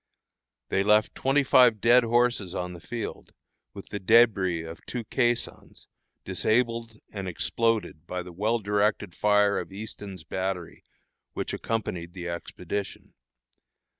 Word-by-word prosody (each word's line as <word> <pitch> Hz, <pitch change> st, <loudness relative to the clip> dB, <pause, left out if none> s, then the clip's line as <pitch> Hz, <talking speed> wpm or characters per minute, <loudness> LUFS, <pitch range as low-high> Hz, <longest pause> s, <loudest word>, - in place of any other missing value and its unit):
They 95 Hz, -, +2 dB
left 105 Hz, +1 st, +3 dB
twenty 135 Hz, +2 st, +2 dB
five 125 Hz, -4 st, +5 dB
dead 120 Hz, +3 st, +5 dB
horses 120 Hz, -5 st, +1 dB
on 90 Hz, 0 st, -3 dB
the 85 Hz, -, -9 dB
field, 115 Hz, +6 st, -6 dB, 0.4 s
with 100 Hz, -, -10 dB
the 105 Hz, -, -4 dB
débris 95 Hz, -6 st, +4 dB
of 80 Hz, -, -10 dB
two 120 Hz, -2 st, -4 dB
caissons, 120 Hz, +1 st, -2 dB, 0.4 s
disabled 115 Hz, -1 st, 0 dB, 0.2 s
and 100 Hz, -2 st, -4 dB
exploded 105 Hz, -3 st, -1 dB
by 90 Hz, 0 st, -4 dB
the 90 Hz, 0 st, -11 dB
well 110 Hz, +6 st, +1 dB
directed 105 Hz, -2 st, 0 dB
fire 105 Hz, 0 st, +3 dB
of -, -, -7 dB
Easton's 100 Hz, -3 st, -8 dB
battery, 95 Hz, +1 st, -4 dB, 0.5 s
which -, -, -3 dB
accompanied 90 Hz, -7 st, -3 dB
the 90 Hz, -2 st, -6 dB
expedition. 90 Hz, +3 st, -5 dB
105 Hz, 130 wpm, -27 LUFS, 90-115 Hz, 0.5 s, five